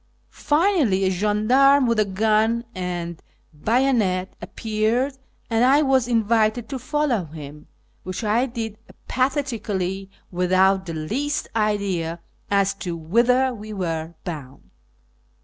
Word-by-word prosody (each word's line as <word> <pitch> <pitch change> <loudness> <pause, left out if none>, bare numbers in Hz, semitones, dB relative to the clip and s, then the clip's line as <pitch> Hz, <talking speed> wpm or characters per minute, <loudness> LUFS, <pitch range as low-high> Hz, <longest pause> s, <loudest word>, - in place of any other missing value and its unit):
Finally, 300 - +2
a 190 - +2
gendarme 230 +8 +4
with 230 -2 +1
a 215 - +4
gun 220 +4 +1
and 175 -2 -4 0.3
bayonet 210 - +1
appeared, 225 +5 -1 0.3
and 230 0 +1
I 275 +4 +5
was 265 -3 +2
invited 225 0 +1
to 270 -2 -4
follow 255 - 0
him, 150 -1 -10 0.3
which 185 +5 -5
I 225 +5 +2
did 225 -3 -5 0.3
apathetically, 220 -8 -1 0.2
without 185 +1 +2
the 165 - -4
least 265 - -2
idea 200 -6 -1 0.3
as 200 0 +2
to 175 -2 -3
whither 245 +10 +2
we 215 -1 -8
were 165 -3 -3
bound. 145 -6 -8
215 Hz, 115 wpm, -23 LUFS, 185-250 Hz, 0.3 s, I